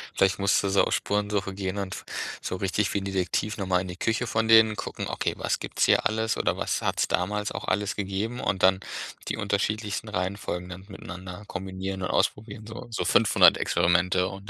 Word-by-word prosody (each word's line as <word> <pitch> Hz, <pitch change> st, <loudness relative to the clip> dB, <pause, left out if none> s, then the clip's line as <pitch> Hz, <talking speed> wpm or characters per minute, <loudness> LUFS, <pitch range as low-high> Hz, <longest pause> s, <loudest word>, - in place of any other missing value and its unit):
Vielleicht 95 Hz, 0 st, +3 dB
musst 100 Hz, +1 st, +3 dB
du 100 Hz, -, 0 dB
so 95 Hz, -, +4 dB
auf -, -, 0 dB
Spurensuche 100 Hz, -1 st, -1 dB
gehen 95 Hz, 0 st, -3 dB
und 95 Hz, -1 st, -4 dB, 0.4 s
so 95 Hz, -, -3 dB
richtig 95 Hz, +2 st, 0 dB
wie 100 Hz, -, +1 dB
'n 95 Hz, -, -6 dB
Detektiv 95 Hz, +3 st, -1 dB
noch 95 Hz, -2 st, -3 dB
mal 90 Hz, -1 st, +2 dB
in 95 Hz, -, -6 dB
die 90 Hz, -, -7 dB
Küche 115 Hz, +4 st, 0 dB
von 110 Hz, 0 st, 0 dB
denen 110 Hz, -1 st, +7 dB
gucken: -, -, -5 dB
“Okay, -, -, -1 dB
was -, -, -1 dB
gibt's -, -, 0 dB
hier -, -, +4 dB
alles 110 Hz, +1 st, 0 dB
oder -, -, 0 dB
was -, -, -1 dB
hat's -, -, +1 dB
damals 105 Hz, +3 st, -1 dB
auch -, -, -5 dB
alles 105 Hz, 0 st, 0 dB
gegeben?” 100 Hz, +5 st, -3 dB
Und 95 Hz, -2 st, -1 dB
dann 95 Hz, 0 st, +5 dB, 0.5 s
die -, -, -2 dB
unterschiedlichsten 105 Hz, +2 st, -1 dB
Reihenfolgen 90 Hz, -2 st, -3 dB
dann 90 Hz, +2 st, -9 dB
miteinander 90 Hz, 0 st, -8 dB
kombinieren 95 Hz, 0 st, -5 dB
und 90 Hz, -, -2 dB
ausprobieren, 105 Hz, 0 st, -1 dB
so 120 Hz, +2 st, -8 dB
so 115 Hz, -, -2 dB
500 -, -, +6 dB
Experimente 90 Hz, +1 st, +2 dB
und 95 Hz, +1 st, -9 dB
100 Hz, 200 wpm, -26 LUFS, 95-105 Hz, 0.5 s, denen